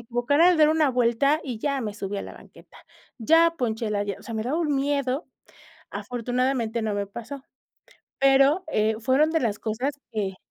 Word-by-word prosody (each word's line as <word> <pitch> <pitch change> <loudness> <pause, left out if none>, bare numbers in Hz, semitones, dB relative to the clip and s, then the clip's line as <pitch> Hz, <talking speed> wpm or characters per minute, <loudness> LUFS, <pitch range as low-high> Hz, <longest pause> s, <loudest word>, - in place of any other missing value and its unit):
equivocara 245 +8 +2
al 360 - +4
dar 305 -1 +6
una 310 -3 +3
vuelta 250 +5 +2
y 245 -6 -5
ya 280 -2 -1
me 210 -3 -4
subí 200 0 -5
a - - -3
la - - -9
banqueta, - - -17 0.4
ya 330 +7 +4
ponché 225 -3 -2
la 205 -1 0
llan 200 -1 -4
o - - -16
sea, 230 - -7
me 220 - -2
daba 280 +8 -1
un 300 -4 0
miedo. 275 +1 -1 0.6
Afortunadamente, 245 -1 -2
no 215 -1 -1
me 200 -1 -2
pasó. 240 +6 -8 0.8
Pero, 275 +5 +4
eh 215 -4 +1
fueron 270 +6 +2
de 325 - +1
las 215 -4 -1
cosas 235 +6 -2 0.2
que 195 -3 -3
250 Hz, 190 wpm, -25 LUFS, 220-285 Hz, 0.8 s, dar